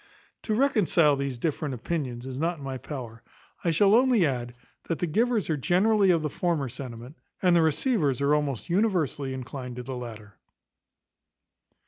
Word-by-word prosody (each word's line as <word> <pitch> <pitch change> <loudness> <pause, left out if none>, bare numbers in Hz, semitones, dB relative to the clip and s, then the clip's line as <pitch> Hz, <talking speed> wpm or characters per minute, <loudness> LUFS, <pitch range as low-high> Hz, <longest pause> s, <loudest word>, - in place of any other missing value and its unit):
To 215 - -1
reconcile 190 - +3
these 140 -2 -3
different 145 0 -2
opinions 125 -2 -4
is 130 0 -5
not 170 +2 0
in 145 - -11
my 135 -1 -4
power. 120 -6 -7 0.4
I 170 - +1
shall 195 +5 +4
only 240 -5 +5
add, 120 -4 -3 0.3
that 165 - -1
the - - -1
givers 225 +6 +1
are 155 - 0
generally 195 - +3
of 165 -3 +3
the - - +1
former 160 -6 -1
sentiment, 125 +2 -8 0.2
and 180 -2 +3
the 170 - +5
receivers 160 - +1
are 140 +1 +2
almost 145 -5 -1
universally 170 - 0
inclined 130 -1 -6
to 125 - -6
the 130 +1 -5
latter. 110 -4 -9
150 Hz, 165 wpm, -27 LUFS, 130-180 Hz, 0.4 s, only